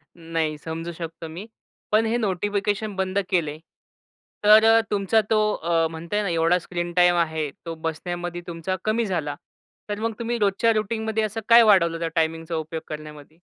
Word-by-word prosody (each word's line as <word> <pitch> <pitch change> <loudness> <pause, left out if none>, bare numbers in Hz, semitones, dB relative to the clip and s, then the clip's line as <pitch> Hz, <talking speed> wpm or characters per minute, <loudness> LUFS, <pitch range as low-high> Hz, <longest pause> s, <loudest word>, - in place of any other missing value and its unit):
नाही 165 -2 -2
समजू 165 +2 -6
शकतो 165 0 -7
मी. 175 +6 -8 0.5
पण 220 +1 +4
हे 230 +2 +1
नोटिफिकेशन 205 0 -1
बंद 190 +1 0
केले 155 -4 0 0.9
तर 215 +1 +8
अ, 225 0 +6
तुमचा 205 +2 +2
तो 215 -1 +3 0.2
अ, 165 0 +1
म्हणताय 170 +6 -3
ना 195 - -1
एवढा 165 +2 +2
स्क्रीन 175 0 -4
टाईम 175 0 +5
आहे 160 -3 0 0.2
तो 165 -1 -5
बसण्यामध्ये 175 +2 -4
तुमचा 170 +2 -3
कमी 220 +1 +1
झाला. 155 -7 -2 0.5
तर 205 0 -3
मग 225 0 -1
तुम्ही 235 +1 -2
रोजच्या 205 +3 +2
रुटीनमध्ये 220 +1 -1
असं 215 +1 -3
काय 235 0 +9
वाढवलं 170 -6 +4
त्या 165 - -1
टाईमिंगचा 165 +1 -1
उपयोग 160 0 -4
करण्यामध्ये? 150 0 -9
175 Hz, 165 wpm, -24 LUFS, 165-210 Hz, 0.9 s, काय